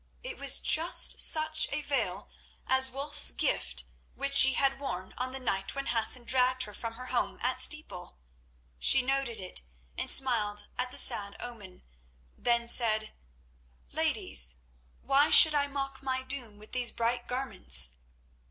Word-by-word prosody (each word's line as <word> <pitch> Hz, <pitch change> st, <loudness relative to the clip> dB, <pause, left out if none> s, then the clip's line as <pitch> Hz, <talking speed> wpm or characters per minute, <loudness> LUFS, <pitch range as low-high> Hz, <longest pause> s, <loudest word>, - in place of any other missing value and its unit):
It -, -, -9 dB
was -, -, +4 dB
just 330 Hz, +3 st, +1 dB
such 310 Hz, 0 st, +4 dB
a 280 Hz, +2 st, -4 dB
veil 285 Hz, -1 st, -4 dB, 0.4 s
as 265 Hz, 0 st, +1 dB
Wulf's 285 Hz, +3 st, -1 dB
gift -, -, -2 dB, 0.3 s
which 275 Hz, 0 st, -5 dB
she 270 Hz, -1 st, +9 dB
had 270 Hz, +1 st, -1 dB
worn 185 Hz, -9 st, -6 dB
on 255 Hz, +1 st, -5 dB
the 265 Hz, -, -6 dB
night 195 Hz, -5 st, -5 dB
when 275 Hz, 0 st, -6 dB
Hassan 235 Hz, +2 st, -1 dB
dragged 255 Hz, +1 st, +1 dB
her 210 Hz, -, -11 dB
from 230 Hz, +2 st, -8 dB
her 250 Hz, +2 st, -10 dB
home -, -, -2 dB
at -, -, -2 dB
Steeple. 300 Hz, -, -2 dB, 0.6 s
She 265 Hz, -, +6 dB
noted 270 Hz, -3 st, -3 dB
it 185 Hz, -, -6 dB, 0.4 s
and -, -, -5 dB
smiled 215 Hz, -6 st, +2 dB
at 250 Hz, 0 st, -4 dB
the -, -, -7 dB
sad 200 Hz, -1 st, +4 dB
omen, 210 Hz, -7 st, -12 dB, 0.5 s
then 235 Hz, -1 st, -2 dB
said: 220 Hz, -3 st, +2 dB, 0.8 s
"Ladies, -, -, -1 dB, 0.5 s
why 275 Hz, +2 st, +1 dB
should 315 Hz, -2 st, +7 dB
I 285 Hz, -1 st, -1 dB
mock 275 Hz, -1 st, -7 dB
my 260 Hz, -1 st, -4 dB
doom 255 Hz, -6 st, -3 dB
with 215 Hz, +1 st, -15 dB
these 250 Hz, -1 st, +2 dB
bright 240 Hz, +1 st, -4 dB
garments?" 65 Hz, -, -1 dB
255 Hz, 150 wpm, -28 LUFS, 220-275 Hz, 0.8 s, she